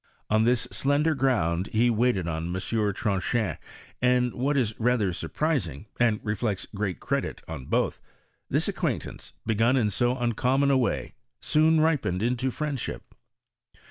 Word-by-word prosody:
On 110 Hz, +1 st, +4 dB
this 120 Hz, 0 st, +2 dB
slender 145 Hz, +3 st, +2 dB
ground 100 Hz, -, +1 dB
he 120 Hz, +2 st, +4 dB
waited 110 Hz, -6 st, +1 dB
on 80 Hz, 0 st, -2 dB
M, 90 Hz, -, -3 dB
Tronchin, 100 Hz, 0 st, -1 dB, 0.4 s
and 125 Hz, -1 st, +3 dB
what 140 Hz, +4 st, 0 dB
is 115 Hz, -5 st, +1 dB
rather 115 Hz, -5 st, +2 dB
surprising, 100 Hz, -, -2 dB
and 115 Hz, -3 st, +3 dB
reflects 105 Hz, -2 st, -2 dB
great 100 Hz, -5 st, -2 dB
credit -, -, -2 dB
on 80 Hz, -5 st, -6 dB
both, -, -, 0 dB, 0.5 s
this -, -, +1 dB
acquaintance, -, -, -3 dB
begun 115 Hz, +4 st, +2 dB
in 110 Hz, -4 st, +2 dB
so 120 Hz, +5 st, +1 dB
uncommon 125 Hz, +3 st, +2 dB
a 135 Hz, -, +4 dB
way, 125 Hz, -, -1 dB, 0.3 s
soon 155 Hz, +1 st, +3 dB
ripened 135 Hz, -, +1 dB
into 125 Hz, +2 st, 0 dB
friendship. 145 Hz, -1 st, -4 dB
120 Hz, 140 wpm, -27 LUFS, 100-130 Hz, 0.5 s, On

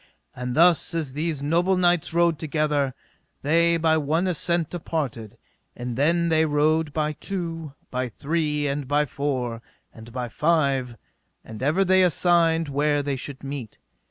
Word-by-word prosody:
And 125 Hz, 0 st, -4 dB
thus 170 Hz, +1 st, +4 dB
as 155 Hz, -6 st, -2 dB
these 150 Hz, -1 st, -2 dB
noble 175 Hz, +5 st, +2 dB
knights 175 Hz, -2 st, +2 dB
rode 170 Hz, -1 st, +2 dB
together, 150 Hz, -3 st, 0 dB, 0.5 s
they 170 Hz, +3 st, +3 dB
by 160 Hz, -1 st, +2 dB
one 155 Hz, +4 st, 0 dB
assent 170 Hz, -2 st, 0 dB
departed, 140 Hz, -, -4 dB, 0.4 s
and 120 Hz, -1 st, -5 dB
then 170 Hz, +5 st, +2 dB
they 160 Hz, -1 st, +3 dB
rode 155 Hz, +1 st, +2 dB
by 150 Hz, 0 st, -1 dB
two, 165 Hz, -4 st, -5 dB, 0.2 s
by 125 Hz, 0 st, -2 dB
three, 150 Hz, +3 st, -1 dB
and 140 Hz, -1 st, -2 dB
by 145 Hz, +2 st, +2 dB
four, 125 Hz, -4 st, -3 dB, 0.3 s
and 115 Hz, +1 st, -12 dB
by 125 Hz, 0 st, -4 dB
five, 135 Hz, -3 st, 0 dB, 0.5 s
and 110 Hz, 0 st, -9 dB
ever 155 Hz, +8 st, +2 dB
they 190 Hz, +1 st, +4 dB
assigned 165 Hz, -1 st, +3 dB
where 145 Hz, +1 st, +1 dB
they 140 Hz, -1 st, -1 dB
should 135 Hz, +1 st, -7 dB
meet. 135 Hz, -5 st, -6 dB
150 Hz, 150 wpm, -24 LUFS, 140-165 Hz, 0.5 s, thus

